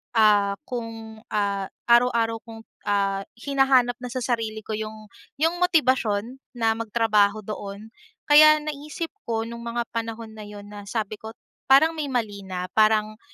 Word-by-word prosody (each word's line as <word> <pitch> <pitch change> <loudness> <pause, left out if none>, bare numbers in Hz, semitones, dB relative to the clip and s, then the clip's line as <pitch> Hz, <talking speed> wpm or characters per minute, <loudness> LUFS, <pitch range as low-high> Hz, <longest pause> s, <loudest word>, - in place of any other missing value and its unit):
Ah, 205 -2 +4
kung 225 -4 -7
ah, 200 -2 -1 0.2
araw-araw 235 -1 +3
kong 225 0 -10 0.2
ah, 195 -1 0
hinahanap 260 -1 +2
na 250 - -6
sa 255 0 -3
sarili 225 -3 -2
ko - - -8
yung 215 0 -6 0.2
yung 325 +4 0
motibasyon 260 - +1 0.2
na 225 -2 +2
magtrabaho 215 -2 +2
doon. 205 +1 -7 0.3
Kaya 305 +1 +8
naisip 305 +3 -5 0.2
ko 225 -1 -1
nung 235 +1 -7
mga 235 +1 -1
panahon 230 -1 -5
na 215 -1 -10
yun, 205 -1 -10
na 205 -1 -10
sabi 215 0 -3
ko 220 +1 -9 0.3
parang 275 +5 +6
may 310 -3 -4
mali 225 -6 -2
na, 180 -1 -5
parang 215 0 +2
225 Hz, 150 wpm, -24 LUFS, 210-250 Hz, 0.3 s, Kaya